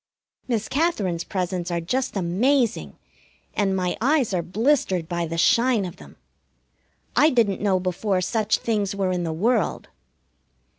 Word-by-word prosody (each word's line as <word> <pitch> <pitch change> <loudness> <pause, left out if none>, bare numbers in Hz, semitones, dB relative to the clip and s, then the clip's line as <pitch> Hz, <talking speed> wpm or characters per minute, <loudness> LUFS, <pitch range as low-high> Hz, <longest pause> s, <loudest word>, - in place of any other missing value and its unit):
Miss 225 -4 -1
Katherine's 215 - 0
presents 180 -2 -3
are 170 -1 -1
just 230 +7 -2
amazing, 230 +7 0 0.6
and 195 -2 +1
my 180 -1 -1
eyes 265 -4 +2
are 180 - +1
blistered 190 - 0
by 170 -1 -2
the 165 +1 -4
shine 230 +4 +3
of 175 - -8
them. 70 -2 -14 1.0
I 300 - +6
didn't 225 -8 +1
know 195 -3 +2
before 185 +2 -1
such 215 +2 +1
things 205 -3 -1
were 195 -2 0
in 180 -1 -1
the 165 - -2
world. 210 +5 0
195 Hz, 145 wpm, -23 LUFS, 180-235 Hz, 1.0 s, I